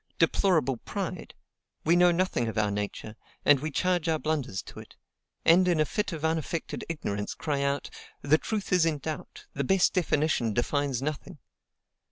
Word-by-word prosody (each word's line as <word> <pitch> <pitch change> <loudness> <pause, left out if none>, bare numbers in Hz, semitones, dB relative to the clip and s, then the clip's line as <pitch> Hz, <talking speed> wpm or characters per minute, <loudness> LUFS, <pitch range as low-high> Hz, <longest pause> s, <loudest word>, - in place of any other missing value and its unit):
Deplorable 155 -10 +2
pride! - - -5 0.5
We 165 +2 +4
know 175 0 +6
nothing 170 -9 0
of 110 - -4
our 105 -1 +2
nature, 105 +1 -4 0.3
and 145 -2 +6
we 155 +3 -3
charge 175 +2 0
our 160 - +2
blunders 150 -11 -2
to - - -11
it; - - -13 0.5
and, 180 +3 +6
in 175 -3 +2
a 155 - +4
fit 210 +4 -2
of 160 -2 -4
unaffected 160 0 -2
ignorance, 105 -11 -3
cry 145 -3 -2
out, 140 0 -1 0.3
"The 155 +2 +4
truth 210 -3 -3
is 180 -2 +5
in 160 -2 +1
doubt, 155 +2 -7
the 140 - -2
best 190 +6 +3
definition 150 - +1
defines 135 0 0
nothing!" 150 +3 -4
155 Hz, 170 wpm, -28 LUFS, 135-170 Hz, 0.5 s, know